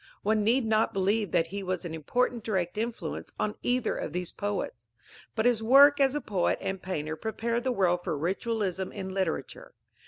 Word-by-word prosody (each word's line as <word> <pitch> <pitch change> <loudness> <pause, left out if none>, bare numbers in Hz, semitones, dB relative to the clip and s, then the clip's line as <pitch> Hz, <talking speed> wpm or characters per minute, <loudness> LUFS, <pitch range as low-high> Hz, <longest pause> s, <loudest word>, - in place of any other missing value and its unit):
One 215 0 +2
need 235 +3 +3
not 220 0 +2
believe 200 +2 +1
that 165 - +2
he 200 +4 -5
was 185 -2 -3
an 165 - -5
important 235 - 0
direct 185 -5 -1
influence 230 +2 -4
on 210 - 0
either 245 -1 0
of 155 - -4
these 180 0 -3
poets. 200 - -4 0.5
But 220 0 0
his 240 -3 +3
work 280 +5 +7
as 275 +1 +3
poet 195 -4 +1
and 190 -1 -3
painter 160 -4 -3
prepared 230 +5 -2
the 260 - +2
world 180 -6 +1
for 155 - -2
ritualism 190 +2 -1
in 190 - -5
literature. 190 -1 -3
205 Hz, 180 wpm, -28 LUFS, 180-230 Hz, 0.5 s, work